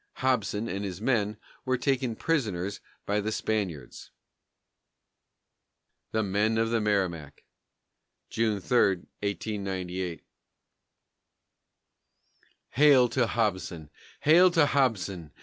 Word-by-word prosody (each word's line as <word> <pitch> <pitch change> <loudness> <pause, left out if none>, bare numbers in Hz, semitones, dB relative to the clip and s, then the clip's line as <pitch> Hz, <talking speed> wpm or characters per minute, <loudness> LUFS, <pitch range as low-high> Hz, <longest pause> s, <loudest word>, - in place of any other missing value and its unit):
Hobson 115 -4 0
and 100 -1 -4
his 95 -3 -5
men 110 -3 0 0.3
were 130 -1 0
taken 125 -2 0
prisoners 100 - -1 0.3
by 105 +1 0
the 110 +2 -2
Spaniards. 95 - -3 2.0
THE 110 0 0
MEN 105 +3 +1
OF 115 0 +1
THE 115 -1 +1
MERRIMAC 90 -8 -1 0.9
[June 110 -3 0
3, 120 +6 +1 0.4
1898] 95 -4 -4 2.5
_Hail 135 -5 +6
to 120 -1 +1
Hobson! 95 -8 -2 0.3
Hail 175 +5 +6
to 165 -4 +4
Hobson! 100 - 0
105 Hz, 95 wpm, -28 LUFS, 95-125 Hz, 2.5 s, Hail